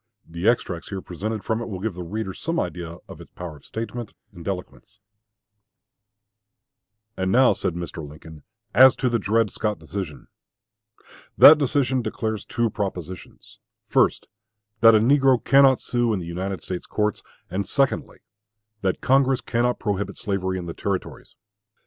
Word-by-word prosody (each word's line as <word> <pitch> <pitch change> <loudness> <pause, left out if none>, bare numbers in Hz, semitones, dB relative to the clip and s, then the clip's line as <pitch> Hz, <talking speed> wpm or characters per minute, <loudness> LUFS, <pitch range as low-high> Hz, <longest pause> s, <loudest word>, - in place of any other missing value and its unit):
The 85 +4 -3
extracts 90 -8 -2
here 95 - -4
presented 105 +4 -4
from 110 +1 -1
it 115 - -5
will 95 -3 -5
give 110 +1 -3
the 90 - -7
reader 95 +2 -4
some 165 - -2
idea 85 -1 -4
of - - -11
its - - -13
power 85 -4 -8
of - - -20
statement 115 0 -6 0.2
and 85 -1 -11
eloquence: 90 - -6 2.2
And 95 -1 -1
now 130 +3 +5
[said 90 -3 -3
Mr. 85 -2 -6
Lincoln] 75 0 -13 0.3
as 130 +4 +8
to 125 - 0
the 120 -1 0
Dred 110 +1 +1
Scott 105 -1 -2
decision. 85 -9 -7 1.1
That 150 +1 +10
decision 130 -2 +1
declares 110 -1 -3
two 120 -1 -1
propositions 95 -4 -6 0.3
first, - - +2 0.5
that 115 0 +7
a - - +6
negro 135 +2 +4
cannot 135 -1 +5
sue 120 -1 0
in 100 - -1
the 85 - -6
United 95 +3 -4
States 90 - -5
courts; 105 -1 -1 0.3
and 100 +2 -2
secondly, 135 -2 0 0.6
that 95 -2 -1
Congress 135 -1 +3
cannot 120 +1 0
prohibit 100 -1 -3
slavery 95 -4 -2
in 90 - -5
the 85 - -5
Territories. 100 +1 -5
105 Hz, 155 wpm, -23 LUFS, 90-120 Hz, 2.2 s, That